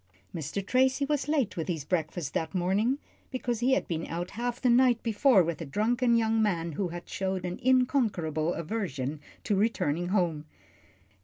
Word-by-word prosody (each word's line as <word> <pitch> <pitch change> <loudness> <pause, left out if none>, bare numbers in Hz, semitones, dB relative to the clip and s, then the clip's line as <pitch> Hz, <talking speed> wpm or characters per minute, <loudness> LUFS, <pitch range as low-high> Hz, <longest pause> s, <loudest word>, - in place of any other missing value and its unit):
Mr. 165 +5 -4
Tracy 260 +4 +2
was 285 -2 -1
late 295 -7 0
with 165 - -3
his 160 -6 -3
breakfast 160 -2 -2
this 160 +3 -2
morning, 200 +9 +1 0.3
because 245 -3 -2
he 255 +3 +3
had - - +1
been 165 -1 -3
out 175 +2 -4
half 240 +2 -3
the 255 - +1
night 245 -1 +4
before 225 -2 +4
with 165 -2 -3
a - - -4
drunken 235 - +2
young 225 -1 +2
man 170 -6 0
who 180 +5 -2
had 175 0 -8
showed 190 -1 -2
an 180 0 -4
unconquerable 215 - +1
aversion 155 - -3 0.2
to 205 - +1
returning 175 -6 0
home. 175 -6 0
195 Hz, 170 wpm, -28 LUFS, 170-245 Hz, 0.3 s, night